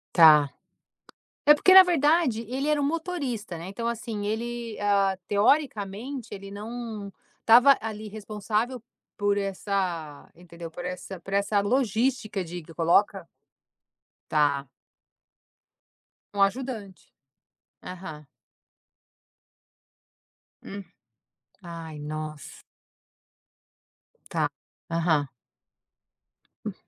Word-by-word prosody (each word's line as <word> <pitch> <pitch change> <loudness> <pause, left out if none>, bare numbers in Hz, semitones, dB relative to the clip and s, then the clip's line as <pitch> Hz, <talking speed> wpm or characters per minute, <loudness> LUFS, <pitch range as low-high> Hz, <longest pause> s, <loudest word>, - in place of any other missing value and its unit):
Tá. 155 -4 +8 1.0
É 295 0 +8
porque 370 +5 +5
na 380 - +13
verdade, 305 -7 +2
ele 265 +3 -2
era 300 -1 +2
um - - +1
motorista, 280 - -3
né, 170 +3 -7
então 230 +4 -5
assim 225 -3 -3
ele, 235 +1 -4
ah, 200 -2 +2
teoricamente 225 +1 0
ele 195 0 -8
não 215 -1 -6 0.3
tava 250 +4 +7
ali 215 -1 -6
responsável 215 +3 -3 0.4
por 205 0 +2
essa 190 -6 -3
entendeu? 170 -1 -10
Por 175 +2 -8
essa 180 0 -6
por 195 +3 -6
essa, 200 +1 +2
logística 225 -1 0
de 175 0 -7
que 165 - -14
coloca. 165 +1 +2 1.0
Tá. 145 -3 +1 1.6
Um 200 - -1
ajudante. 205 -2 -1 0.8
Aham. 160 -5 -8 2.4
Hum. 200 0 -7 0.8
Ai 165 -3 -8
nossa. 155 0 -7 1.7
Tá. - - +1 0.4
Aham. 165 -3 +1 1.4
Hum. - - -3
205 Hz, 90 wpm, -26 LUFS, 175-240 Hz, 2.4 s, na